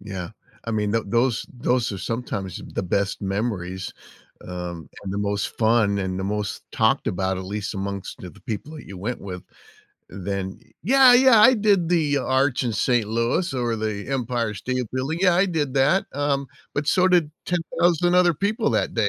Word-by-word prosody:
Yeah. 95 -4 -6 0.3
I 115 - -4
mean, 105 -2 0
tho 115 0 +1
those 120 +2 +1
those 125 -1 0
are 95 - -5
sometimes 100 -5 -4
the - - -1
best 100 +3 -1
memories, 95 -2 -3 0.5
um, 90 -2 -6
and 95 -1 -5
the 100 - -2
most 100 0 -2
fun 110 -3 +3
and 95 -1 -2
the 95 - -3
most 105 0 -3
talked - - +2
about, 95 0 -1
at 95 - -6
least 100 +1 -4
amongst 100 0 -5
the 90 - -9
the - - -19
people 120 +8 -5
that - - -11
you 95 -2 -9
went 120 +6 -4
with, 90 -2 -7 0.7
then 95 0 -4 0.2
"Yeah, 260 +4 +7
yeah, 245 -3 +7
I 255 +4 +8
did 200 -6 +2
the 155 -5 +2
arch 130 0 +1
in 120 - -1
St. 120 0 +1
Louis 115 +10 0
or 120 -2 0
the 105 -2 -3
Empire 120 -4 -1
State 125 +3 -2
Building. 135 +6 -2
Yeah, 180 -2 +5
I 190 +3 +4
did 150 -6 -1
that, 140 +8 +3
um, 140 -1 0 0.3
but 145 0 -1
so 185 +4 +4
did 175 -5 +3 0.2
10,000 175 0 +1
other 180 -2 +5
people 215 - 0
that - - 0
day. 110 -3 +2
115 Hz, 185 wpm, -23 LUFS, 100-150 Hz, 0.7 s, I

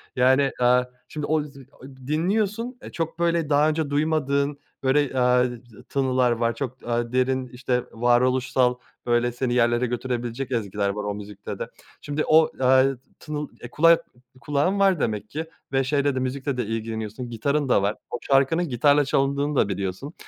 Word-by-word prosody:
Yani, 130 +2 +4
aaa, 125 0 +4 0.2
şimdi 150 -1 -5
o 155 0 +1
z 145 -1 -12
o - - -20 0.2
dinliyorsun, 210 - -1
eee, - - -9
çok 165 0 -4
böyle 170 -2 +1
daha 150 +1 +4
önce 155 -1 -1
duymadığın 145 -1 0 0.2
böyle, 135 0 +2
aaa, 125 0 +4
t 120 -3 -7
tınılar 130 -2 +2
var. 115 0 0
Çok, 130 -1 -5
aaa, 120 0 -1
derin 130 0 +1
işte 125 0 -2
varoluşsal, 125 +1 +2 0.3
böyle 120 0 +2
seni 120 0 -2
yerlere 120 0 +2
götürebilecek 120 +1 -3
ezgiler 105 -4 -1
var 105 +1 -3
o 105 0 -2
müzikte 100 -1 -8
de. - - -4 0.3
Şimdi 145 +1 -2
o, 160 0 +5
eee, 130 +1 +4 0.2
tınıl, 150 -1 -5
eee, 120 - -8
kulak 165 +4 +4 0.4
kulağın 150 +9 0
var 195 -4 +4
demek 105 -4 -2
ki 160 +2 -4 0.3
ve 135 0 +2
şeyle 140 0 +1
de, - - 0
müzikle 130 +1 -2
de 125 - -1
ilgileniyorsun, 110 +1 -4
gitarın 140 +5 -1
da 100 - +4
var. 100 +2 0
O - - -3
şarkının 140 +5 +2
gitarla 145 +4 +3
çalındığını 140 +2 0
da 130 - +3
biliyorsun. 100 - -4
130 Hz, 170 wpm, -24 LUFS, 120-145 Hz, 0.4 s, o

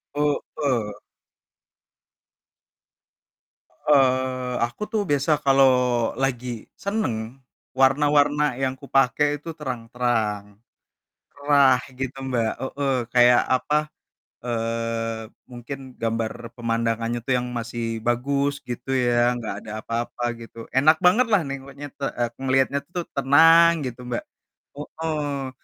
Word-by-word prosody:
Heeh. 140 -6 -1 2.9
Eee, 130 -3 +2
aku 120 - -12
tuh 215 -2 +1
biasa 145 +2 +1
kalau 135 -1 +5 0.6
lagi 125 -2 -1 0.4
senang, 200 - -1 0.6
warna-warna 145 +1 +3
yang 130 -1 0
kupakai 135 +1 +2 0.2
itu - - -7
terang-terang, 115 -5 -2 0.9
cerah 140 -3 +4 0.2
gitu 130 0 -4
Mbak, 115 -4 0
heeh. 135 +1 -2 0.2
Kayak 120 0 +6
apa, 130 +4 +1 0.7
eee, 115 -1 -2 0.2
mungkin 125 +3 -8 0.2
gambar 115 -1 -1 0.3
pemandangannya 115 0 -1
tuh 130 - +1
yang 125 - -2
masih 115 -1 -4
bagus, 140 +4 0 0.2
gitu 120 +2 -6 0.2
ya, 120 0 +2
nggak 110 -4 -4
ada 105 - -7
apa-apa 120 +1 -3 0.2
gitu. 115 0 -10
Enak 155 +4 +5
banget 225 +8 +5
lah 200 - +5
nengoknya 140 +1 -7
te 140 - -5
eee, 120 -1 0
ngelihatnya 135 +1 +2
tuh 175 -1 -3
tenang, 160 +3 +5
gitu 125 0 -6
Mbak. 120 - -2 0.6
Heeh, 145 -3 -3
130 Hz, 105 wpm, -23 LUFS, 120-145 Hz, 2.9 s, Kayak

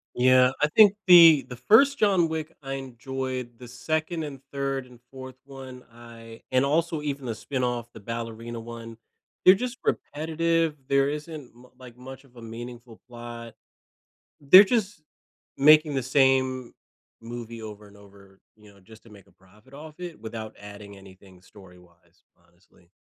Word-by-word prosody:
Yeah, 130 0 +4
I 150 - +3
think 205 +4 +5
the 165 -5 +8
the 125 - -8
1st 250 - +4
John 190 -5 +2
Wick, 160 0 -5
I 135 0 -5
enjoyed. 130 -1 -6
The 125 - -11
2nd 155 +6 -3
and 140 -3 -8
3rd 135 -1 -3
and 125 -1 -18
4th 130 -1 -11
one, 130 -2 -11
I 115 -1 -14
and 130 +1 +2
also 160 +2 0
even 140 -2 -5
the 120 - -3
spinoff, 120 0 -3
the - - -11
Ballerina 115 +1 -7
one, 115 0 -10 0.5
they're 185 - +8
just 250 +5 -5
repetitive, 165 +1 -1
there 140 0 +2
isn't 150 -3 -7
mu 125 +1 -18
like 125 -2 -14
much 130 +2 -12
of 125 -2 -24
a 120 - -12
meaningful 120 0 -10
plot. 120 -1 -10 0.9
They're 150 +8 +8
just 205 -4 -2 0.6
making 150 +1 +5
the 135 - -1
same 130 -1 +1 0.5
movie 115 0 -9
over 105 -1 -10
and 100 0 -18
over, 100 -1 -19 0.2
you 105 -1 -19
know, 100 - -22
just 110 +4 -18
to - - -17
make 100 -3 -17
a - - -25
profit 105 +7 -24
off 150 +2 -11
it 175 -6 -8
without 110 -1 -8
adding 100 0 -12
anything 95 -1 -17
story-wise, 90 -2 -20 0.2
honestly. 85 0 -29
125 Hz, 160 wpm, -25 LUFS, 115-150 Hz, 0.9 s, the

